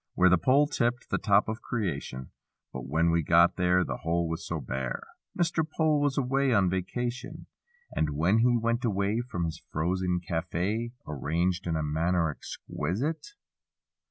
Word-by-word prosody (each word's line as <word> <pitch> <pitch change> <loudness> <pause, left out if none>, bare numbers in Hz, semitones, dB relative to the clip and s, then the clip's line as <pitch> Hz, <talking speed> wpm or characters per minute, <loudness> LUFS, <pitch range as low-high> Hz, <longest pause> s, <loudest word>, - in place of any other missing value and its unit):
Where 95 0 +5
the 90 - +5
pole 135 - +4
tipped 120 -4 -1
the - - +1
top 100 -2 +3
of 110 +1 -4
creation 70 - -4 0.4
But 65 0 -6
when 80 +4 +2
we 85 0 +2
got 85 +2 +4
there 90 0 +3
The - - -4
hole 85 +1 0
was 80 +1 -4
so 80 - -3
bare— 65 -1 -4 0.3
Mr. 170 -2 +1
Pole 155 -2 +3
was 145 -1 +1
away 135 0 +2
on 95 -3 +3
vacation. 120 - -3 0.5
And 75 - 0
when 90 +8 +3
he 120 +1 +4
went 115 +1 0
away, 100 -1 +1
From 90 -7 -2
his 80 -2 -5
frozen 90 +2 0
cafe, 90 +7 -2
(Arranged 85 +6 -1
in 80 - 0
a 80 - -1
manner 80 +2 +1
exquisite). 130 - -4
90 Hz, 160 wpm, -28 LUFS, 80-120 Hz, 0.5 s, Where